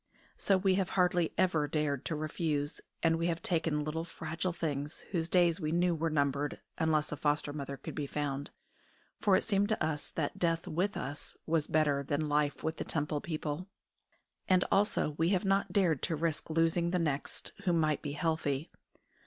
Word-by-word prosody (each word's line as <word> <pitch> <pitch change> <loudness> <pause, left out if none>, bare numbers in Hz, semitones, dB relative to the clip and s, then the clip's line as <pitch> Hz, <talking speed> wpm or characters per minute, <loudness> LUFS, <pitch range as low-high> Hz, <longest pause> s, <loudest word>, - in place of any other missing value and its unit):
So 195 - +2
we 190 0 +3
have 185 - -2
hardly 180 -2 +3
ever 160 -5 +2
dared 145 -2 -1
to 160 - -1
refuse, 150 -1 -2 0.2
and 165 0 +3
we 170 - +1
have 165 -1 -2
taken 160 -3 +1
little 155 +2 -2
fragile 165 +1 -3
things 150 -3 -3
whose 170 -3 -1
days 175 0 +3
we 155 -1 -1
knew 175 +1 +3
were 165 0 0
numbered 145 -1 0 0.2
unless 155 -2 +2
a - - -1
foster 145 0 0
mother 140 -2 -5
could - - -7
be 145 -2 -3
found, 140 -1 -2 0.7
for 200 -3 +4
it - - +2
seemed 205 -1 +2
to 215 -6 +1
us 155 -2 -2
that 150 -3 -3
death 165 -1 +1
with 185 +6 0
us 145 +1 -5
was 160 -2 +1
better 150 -3 +2
than 145 +2 -1
life 145 -1 +1
with 160 0 -1
the - - -2
Temple 150 -1 -1
people; 155 +1 -3 0.8
and 185 -1 +5
also 200 -6 +2
we 165 +1 +3
have 190 0 +1
not 195 +1 +2
dared 175 -9 +2
to 165 - 0
risk 160 0 -1
losing 165 +1 +2
the 180 - +1
next, 150 -5 -2
who 180 - +3
might 155 -3 +2
be 145 -2 -4
healthy. 155 -2 -1
160 Hz, 185 wpm, -32 LUFS, 150-175 Hz, 0.8 s, and